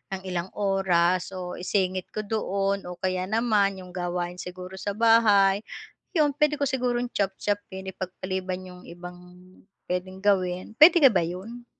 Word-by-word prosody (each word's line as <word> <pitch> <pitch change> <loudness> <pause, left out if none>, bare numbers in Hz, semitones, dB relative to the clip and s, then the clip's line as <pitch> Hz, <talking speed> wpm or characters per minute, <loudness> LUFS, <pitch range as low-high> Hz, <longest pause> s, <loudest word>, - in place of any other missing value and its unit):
ng 190 - -8
ilang 180 -1 -3
oras 190 -2 +1
o 180 -1 -6
isingit 185 0 -1
ko 215 - -2
doon 200 -2 -1
o 180 - -6
kaya 185 0 -2
naman 205 -3 +1
yung 180 - -12
gawain 175 0 -3
siguro 180 +1 -8
sa 200 +2 -3
bahay, 210 -3 +5 0.6
yun, 300 -3 +4
pwede 300 0 +3
ko 285 - -3
sigurong 245 -2 -1
chop-chopin, 195 -1 -3
ipagpaliban 185 0 -4
yung 180 -1 -11
ibang 175 +1 -9 0.7
pwedeng 185 +1 -4
gawin, 185 -2 +1
pwede 330 +1 +8
ka 270 - +9
ba 190 - +2
yun? 200 +8 -7
190 Hz, 150 wpm, -26 LUFS, 180-210 Hz, 0.7 s, ka